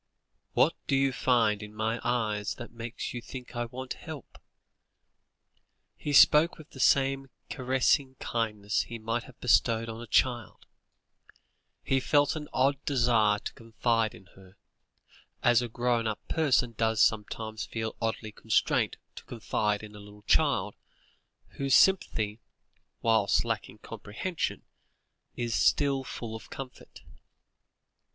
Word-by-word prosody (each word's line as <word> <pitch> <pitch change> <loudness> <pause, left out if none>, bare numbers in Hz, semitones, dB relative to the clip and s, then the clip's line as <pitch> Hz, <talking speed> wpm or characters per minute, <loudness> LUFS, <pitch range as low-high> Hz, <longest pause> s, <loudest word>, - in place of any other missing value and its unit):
"What - - +4
do - - +2
you 135 0 +2
find 115 -5 +2
in 105 0 -10
my 110 +2 -1
eyes 110 -4 -1
that 120 - -9
makes 115 0 -6
you 120 - -5
think 125 +1 -10
I 120 0 -1
want 130 +2 -6
help?" - - -10 1.6
He 145 - -4
spoke 150 +3 +6
with 155 - -14
the 130 - -12
same 135 0 +2 0.2
caressing 130 +1 +1
kindliness 105 -3 -1
he 115 - -7
might 115 +2 -3
have 125 - -16
bestowed 115 -1 +2
on 115 +1 -7
a 120 - -9
child; 120 +1 0 1.2
he 135 - +1
felt 145 +3 +2
an 150 -1 -6
odd 135 +2 +1
desire 120 -6 +3
to - - -7
confide 115 -1 -1
in 95 - -15
her, 95 0 -18 0.9
as 120 -1 +5
a 120 - -4
grown 120 0 0
up 110 - -5
person 135 -7 +2
does 110 -1 0
sometimes 110 0 0
feel 110 -1 -4
oddly 110 -1 -2
constrained 110 0 +1 0.2
to - - -11
confide 105 -2 -2
in 105 -1 -10
a - - -10
little 105 0 -14
child, 105 -6 +2 0.8
whose 135 -1 +2
sympathy, 110 - +3 0.6
whilst 110 -3 +3
lacking - - -3
comprehension, 160 - -4 0.7
is 120 -1 -2
still 140 +1 +2
full 115 -3 -6
of 110 - -10
comfort. 130 -2 -10
115 Hz, 135 wpm, -29 LUFS, 110-130 Hz, 1.6 s, spoke